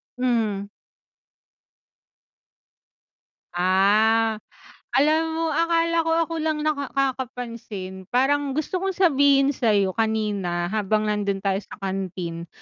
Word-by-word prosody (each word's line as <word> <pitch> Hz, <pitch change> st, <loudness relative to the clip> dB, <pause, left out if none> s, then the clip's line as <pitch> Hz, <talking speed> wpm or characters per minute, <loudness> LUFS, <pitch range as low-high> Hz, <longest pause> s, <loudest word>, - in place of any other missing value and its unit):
Mhm. 220 Hz, -5 st, -1 dB, 2.9 s
Ah, 210 Hz, +4 st, +3 dB, 0.6 s
alam 305 Hz, +4 st, +4 dB, 0.2 s
mo 330 Hz, -, -1 dB
akala 335 Hz, 0 st, +2 dB
ko 325 Hz, -, +1 dB
ako 330 Hz, -, -7 dB
lang 310 Hz, -1 st, -1 dB
nakakapansin, 245 Hz, -9 st, -3 dB
parang 275 Hz, +2 st, +1 dB
gusto 315 Hz, +4 st, -1 dB
kong 385 Hz, -1 st, -2 dB
sabihin 285 Hz, -6 st, +4 dB
sa 235 Hz, -3 st, 0 dB
'yo 195 Hz, -2 st, +2 dB
kanina 210 Hz, -6 st, -1 dB
habang 215 Hz, 0 st, 0 dB
nando'n 200 Hz, -2 st, -1 dB
tayo 195 Hz, 0 st, +1 dB
sa -, -, -12 dB
canteen. 185 Hz, -3 st, -4 dB
225 Hz, 100 wpm, -23 LUFS, 195-280 Hz, 2.9 s, alam